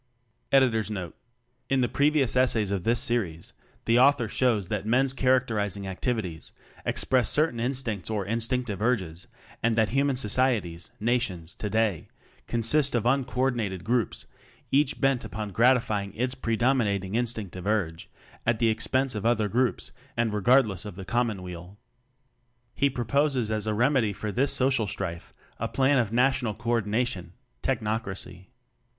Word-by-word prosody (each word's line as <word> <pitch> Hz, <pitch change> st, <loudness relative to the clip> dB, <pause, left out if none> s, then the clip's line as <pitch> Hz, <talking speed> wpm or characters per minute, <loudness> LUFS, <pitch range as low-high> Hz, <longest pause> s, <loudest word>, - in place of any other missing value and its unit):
By 135 Hz, -, +5 dB
William 130 Hz, -2 st, +4 dB
Henry 110 Hz, 0 st, 0 dB
Smyth 105 Hz, 0 st, -5 dB
Note 90 Hz, -4 st, -6 dB, 0.5 s
In 135 Hz, -1 st, +2 dB
the 120 Hz, -, +2 dB
previous 140 Hz, -1 st, +2 dB
essays 115 Hz, -5 st, +2 dB
of 95 Hz, -3 st, -2 dB
this 115 Hz, +3 st, +2 dB
series 115 Hz, -, -2 dB, 0.3 s
the 115 Hz, +1 st, +4 dB
author 135 Hz, -2 st, +4 dB
shows 110 Hz, -5 st, +1 dB
that 105 Hz, -3 st, -2 dB
men's 130 Hz, +3 st, +3 dB
characterizing 115 Hz, -7 st, +1 dB
activities 95 Hz, -3 st, -3 dB, 0.3 s
express 130 Hz, -2 st, +2 dB
certain 150 Hz, -6 st, +2 dB
instincts 120 Hz, -6 st, -2 dB
or 105 Hz, -3 st, -2 dB
instinctive 115 Hz, -1 st, -1 dB
urges 95 Hz, -8 st, -1 dB, 0.3 s
and 115 Hz, -1 st, +1 dB
that 110 Hz, -1 st, +2 dB
human 140 Hz, +2 st, +1 dB
societies 105 Hz, -8 st, 0 dB
(nations) 105 Hz, -7 st, -1 dB
today 105 Hz, -4 st, -1 dB, 0.4 s
consist 125 Hz, +4 st, +2 dB
of 120 Hz, -, 0 dB
uncoordinated 125 Hz, -7 st, 0 dB
groups, 120 Hz, -3 st, -1 dB, 0.5 s
each 140 Hz, 0 st, +2 dB
bent 135 Hz, -3 st, +1 dB
upon 105 Hz, -1 st, -5 dB
gratifying 110 Hz, -4 st, +2 dB
its 125 Hz, +2 st, 0 dB
predominating 115 Hz, -6 st, 0 dB
instinctive 110 Hz, -6 st, -2 dB
urge 90 Hz, -7 st, -1 dB, 0.3 s
at 115 Hz, 0 st, +1 dB
the 115 Hz, 0 st, +2 dB
expense 130 Hz, +4 st, 0 dB
of 105 Hz, -2 st, -4 dB
other 115 Hz, -2 st, +2 dB
groups 120 Hz, +4 st, 0 dB, 0.3 s
and 115 Hz, -2 st, +1 dB
regardless 105 Hz, -3 st, +3 dB
of 105 Hz, -4 st, -8 dB
the 95 Hz, 0 st, -8 dB
common 115 Hz, -2 st, -1 dB
weal. 90 Hz, +2 st, -9 dB, 1.0 s
He 140 Hz, -, +2 dB
proposes 130 Hz, -1 st, 0 dB
as 110 Hz, 0 st, -1 dB
a 105 Hz, -, 0 dB
remedy 120 Hz, -2 st, +2 dB
for 105 Hz, +2 st, -4 dB
this 135 Hz, +6 st, +2 dB
social 130 Hz, -4 st, +2 dB
strife 85 Hz, -3 st, -5 dB, 0.3 s
a -, -, -1 dB
plan 135 Hz, 0 st, +2 dB
of 115 Hz, -4 st, 0 dB
National 125 Hz, -3 st, +1 dB
Co 115 Hz, +1 st, -3 dB
ordination 105 Hz, -5 st, -1 dB, 0.3 s
Technocracy. 105 Hz, -6 st, -3 dB
115 Hz, 145 wpm, -27 LUFS, 100-125 Hz, 1.0 s, By